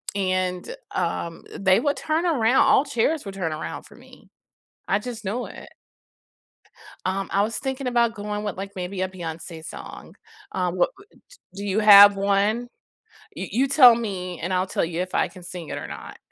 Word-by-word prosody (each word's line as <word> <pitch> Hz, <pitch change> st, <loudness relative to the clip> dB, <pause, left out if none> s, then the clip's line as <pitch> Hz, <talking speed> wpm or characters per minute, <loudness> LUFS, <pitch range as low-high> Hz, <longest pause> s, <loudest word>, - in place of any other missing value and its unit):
and, 185 Hz, -, -1 dB, 0.2 s
um, 165 Hz, -1 st, -3 dB, 0.2 s
they 190 Hz, 0 st, +4 dB
would 285 Hz, +4 st, 0 dB
turn 315 Hz, +3 st, -1 dB
aroun 255 Hz, -8 st, +2 dB
all 280 Hz, -, +5 dB
chairs 280 Hz, +3 st, 0 dB
would 195 Hz, -, -6 dB
turn 185 Hz, -5 st, -3 dB
around 155 Hz, -, -6 dB
for -, -, -16 dB
me. -, -, -18 dB, 0.6 s
I 195 Hz, -, +2 dB
just 230 Hz, -1 st, -7 dB
know 235 Hz, +6 st, -2 dB
it. -, -, -11 dB, 1.4 s
Um, 190 Hz, +1 st, -2 dB
I 200 Hz, -, +3 dB
was 220 Hz, +1 st, -2 dB
thinking 265 Hz, -1 st, -4 dB
about 235 Hz, -2 st, +2 dB
going 210 Hz, 0 st, -4 dB
with, 205 Hz, -4 st, -3 dB
like, 195 Hz, +1 st, -6 dB
maybe 185 Hz, +1 st, -4 dB
a 185 Hz, -, 0 dB
Beyonce 165 Hz, -2 st, -8 dB
song, -, -, -10 dB, 0.4 s
um, 180 Hz, -1 st, -1 dB
what, 180 Hz, -, +2 dB
w 400 Hz, 0 st, -17 dB
d -, -, -27 dB, 0.3 s
do -, -, -5 dB
you 200 Hz, +1 st, 0 dB
have 205 Hz, -1 st, +9 dB
one? 200 Hz, +4 st, +1 dB, 0.7 s
You 190 Hz, -, -5 dB
you 255 Hz, +7 st, +2 dB
tell 260 Hz, -3 st, +8 dB
me, 185 Hz, -6 st, -4 dB
and 175 Hz, +3 st, -3 dB
I'll 185 Hz, +1 st, +1 dB
tell 170 Hz, -, 0 dB
you 170 Hz, +1 st, -3 dB
if 185 Hz, 0 st, -5 dB
I -, -, +2 dB
can 180 Hz, -1 st, -14 dB
sing 175 Hz, -2 st, -8 dB
it -, -, -4 dB
or -, -, -6 dB
not. -, -, -9 dB
200 Hz, 190 wpm, -24 LUFS, 185-235 Hz, 1.4 s, have